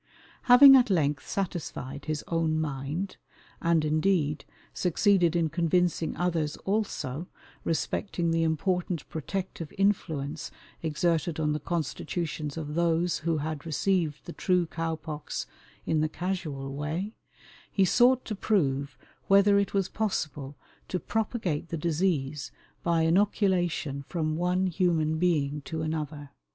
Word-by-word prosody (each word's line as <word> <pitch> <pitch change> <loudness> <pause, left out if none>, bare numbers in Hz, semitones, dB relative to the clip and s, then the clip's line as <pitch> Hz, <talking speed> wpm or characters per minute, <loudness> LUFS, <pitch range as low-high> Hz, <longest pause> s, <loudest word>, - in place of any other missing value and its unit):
Having 270 +2 +10
at 250 -2 +3
length 145 -7 +1
satisfied 155 -7 -4
his 155 -1 -2
own 160 -2 +1
mind, 150 +5 -3 0.4
and, 165 -2 +2
indeed, 155 -1 +1 0.3
succeeded 180 -1 +3
in 170 -2 +2
convincing 170 +1 +1
others 165 -4 0
also, 180 -7 -2 0.4
respecting 165 +1 -1
the 165 0 +2
important 170 +1 0
protective 165 0 -4
influence 160 -7 0 0.3
exerted 160 0 0
on 150 -1 +1
the 150 - -2
constitutions 155 -1 -3
of 150 -2 -4
those 170 +1 +1
who 165 0 0
had 155 0 -3
received 165 -1 0
the 175 - -7
true 180 -2 +1
cow 165 0 -3
pox 155 -1 -5 0.4
in 155 -1 +1
the 155 - +1
casual 155 -5 -4
way, 160 +9 -3 0.6
he 195 - +3
sought 250 +6 +4
to 220 - -3
prove 140 -10 0 0.3
whether 200 +1 +6
it 200 0 -1
was 195 -2 +2
possible 150 -11 -3 0.3
to 180 - -2
propagate 205 -9 -2
the 165 - -3
disease 155 -3 -1 0.3
by 170 -1 +2
inoculation 175 -5 +1
from 155 -3 -1
one 180 +3 +1
human 165 -4 +1
being 150 -5 +1
to 160 +2 -4
another. 150 -2 -4
165 Hz, 125 wpm, -28 LUFS, 150-185 Hz, 0.6 s, Having